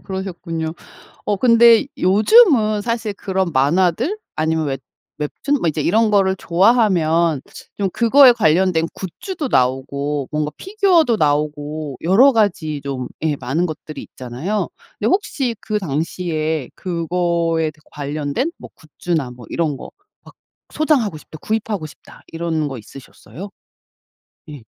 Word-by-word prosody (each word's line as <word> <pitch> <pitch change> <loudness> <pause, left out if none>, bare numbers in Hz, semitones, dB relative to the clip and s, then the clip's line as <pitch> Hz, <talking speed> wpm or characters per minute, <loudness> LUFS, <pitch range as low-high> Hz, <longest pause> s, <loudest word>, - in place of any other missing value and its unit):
그러셨군요. 175 -4 -5 0.5
어 205 - 0
근데 235 +1 +5
요즘은 215 - +4
사실 230 -2 -2
그런 190 -2 -2
만화들 180 - +1 0.2
아니면 160 0 0
웹 135 -1 -3 0.4
웹툰 210 - -2
뭐 170 - +2
이제 155 0 -2
이런 215 +8 +2
거를 195 -2 +3
좋아하면 170 - +2 0.4
좀 195 -1 0
그거에 250 +4 +6
관련된 175 -4 +2
굿즈도 290 - -6
나오고 135 - 0
뭔가 150 -1 -1
피규어도 370 - +2
나오고 150 -2 -1
여러 225 +11 +5
가지 175 -9 0
좀 135 -3 -4
예 155 -2 +1
많은 135 +8 -1
것들이 155 -2 -8
있잖아요. 135 - -4 0.3
근데 - - -2
혹시 275 - 0
그 215 -1 -2
당시에 160 -2 -2
그거에 170 -2 -1 0.2
관련된 145 - -3
뭐 - - -10
굿즈나 155 -3 -4
뭐 120 -2 -12
이런 155 -5 -1
거 - - -10 0.3
막 - - -16 0.4
'소장하고 275 - +1
싶다. 155 +1 -12
구입하고 210 -6 -2
싶다.' 145 - -16
이런 165 -2 -2
거 135 - -6
있으셨어요? 135 - -11 1.0
예. 145 -5 -10
170 Hz, 280 characters per minute, -19 LUFS, 150-215 Hz, 1.0 s, 그거에